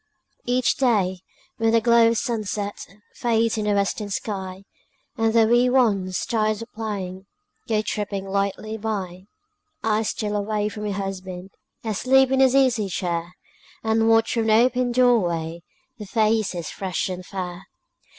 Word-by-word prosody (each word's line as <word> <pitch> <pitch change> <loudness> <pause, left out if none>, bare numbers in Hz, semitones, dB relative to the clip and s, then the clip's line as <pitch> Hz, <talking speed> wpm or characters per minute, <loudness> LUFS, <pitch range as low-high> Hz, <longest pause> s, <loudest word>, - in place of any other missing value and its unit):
Each 250 0 +1
day, 200 -8 +2 0.4
when 225 0 +2
the 230 0 +4
glow 235 0 +5
of 230 0 +2
sunset 210 -3 -3 0.3
Fades 230 -1 +1
in 215 -1 -2
the 205 -1 +2
western 200 +1 -1
sky, 190 -2 -5 0.5
And 225 -2 +1
the 225 0 +5
wee 240 +2 +4
ones, 200 -8 +1
tired 215 -1 0
of - - -15
playing, 195 -4 -5 0.4
Go 215 -1 +1
tripping 205 -2 -3
lightly 200 +3 -2
by, 195 -4 -4 0.6
I 220 -1 +2
steal 210 -1 -2
away 210 0 -1
from 210 0 -6
my - - -1
husband, 190 -2 -5 0.3
Asleep 260 +5 +3
in 265 - +2
his 265 -1 +5
easy 245 -7 +3
chair, 175 -1 -3 0.5
And 225 0 +2
watch 225 0 +3
from 230 -2 0
the 215 - +4
open 245 +1 +3
door 245 -1 +4
way 170 -2 -3 0.4
Their 210 - -7
faces 215 -5 0
fresh 190 -2 -2
and 185 -1 -5
fair. 185 0 -6
215 Hz, 150 wpm, -23 LUFS, 190-230 Hz, 0.6 s, glow